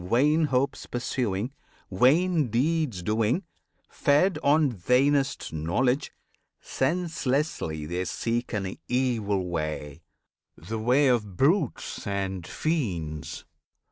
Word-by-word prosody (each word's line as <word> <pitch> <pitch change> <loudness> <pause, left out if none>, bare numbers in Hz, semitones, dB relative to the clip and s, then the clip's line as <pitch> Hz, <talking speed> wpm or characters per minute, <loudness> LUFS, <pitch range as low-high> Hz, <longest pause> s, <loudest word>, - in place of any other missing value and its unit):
Vain 145 - +3
hopes 135 -1 -1
pursuing, 120 -2 -2 0.4
vain 150 - +3
deeds 130 - 0
doing; 110 - +1 0.4
fed 150 +7 +2
On 145 -1 +4
vainest 135 - +1
knowledge, 125 - 0 0.5
senselessly 140 - -1
they 90 +4 -2
seek 115 +7 -2
An 95 -4 -3
evil 110 -7 0
way, 75 -2 -4 0.6
the 110 +7 -5
way 125 +6 +3
of 105 -7 0
brutes 150 - 0
and 95 -3 -3
fiends. 90 - -3
120 Hz, 95 wpm, -27 LUFS, 95-145 Hz, 0.6 s, On